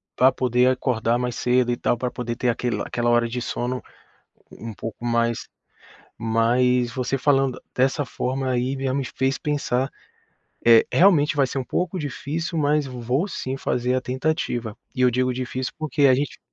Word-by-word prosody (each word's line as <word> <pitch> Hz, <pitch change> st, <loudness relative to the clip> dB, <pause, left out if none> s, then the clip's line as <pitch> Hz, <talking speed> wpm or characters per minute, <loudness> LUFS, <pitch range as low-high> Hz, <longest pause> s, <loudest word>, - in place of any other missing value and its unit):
pra 130 Hz, +2 st, +5 dB
poder 125 Hz, -1 st, +2 dB
acordar 120 Hz, -2 st, +1 dB
mais 125 Hz, -1 st, -2 dB
cedo 125 Hz, 0 st, +2 dB
e -, -, -3 dB
tal, 120 Hz, -, 0 dB
pra 125 Hz, +1 st, -2 dB
poder 120 Hz, -2 st, -4 dB
ter 125 Hz, -, -1 dB
aquele 120 Hz, 0 st, -1 dB
aquela 120 Hz, 0 st, -1 dB
hora 120 Hz, 0 st, +3 dB
de 120 Hz, +1 st, -4 dB
sono 125 Hz, +1 st, -3 dB, 0.7 s
um 115 Hz, -1 st, -8 dB
pouco 115 Hz, +2 st, -7 dB
mais 115 Hz, -1 st, 0 dB, 0.7 s
mas 120 Hz, +2 st, +2 dB
você 130 Hz, +1 st, -1 dB
falando 135 Hz, -1 st, +1 dB
dessa 135 Hz, +3 st, +1 dB
forma 130 Hz, +1 st, -2 dB
aí, 125 Hz, +2 st, 0 dB
já 135 Hz, -1 st, -1 dB
me 135 Hz, 0 st, -1 dB
fez 135 Hz, +2 st, -1 dB
pensar 135 Hz, -3 st, -1 dB, 0.8 s
é, 115 Hz, -1 st, +7 dB
realmente 165 Hz, -6 st, +5 dB
vai 140 Hz, -2 st, +4 dB
ser 130 Hz, -, -4 dB
um 130 Hz, -, -2 dB
pouco 180 Hz, +8 st, -2 dB
difícil, 160 Hz, +3 st, -4 dB
mas 150 Hz, 0 st, +2 dB
vou 125 Hz, -, -1 dB
sim, 130 Hz, -7 st, -4 dB
fazer 125 Hz, -1 st, -1 dB
a 130 Hz, -, +1 dB
tentativa. 130 Hz, -4 st, -2 dB, 0.2 s
E 130 Hz, -, 0 dB
eu 125 Hz, -, +5 dB
digo 125 Hz, +1 st, +1 dB
difícil, 130 Hz, +1 st, -4 dB
porque 155 Hz, -2 st, +2 dB
a 130 Hz, -, +6 dB
gente 140 Hz, +2 st, -2 dB
125 Hz, 175 wpm, -23 LUFS, 120-135 Hz, 0.8 s, é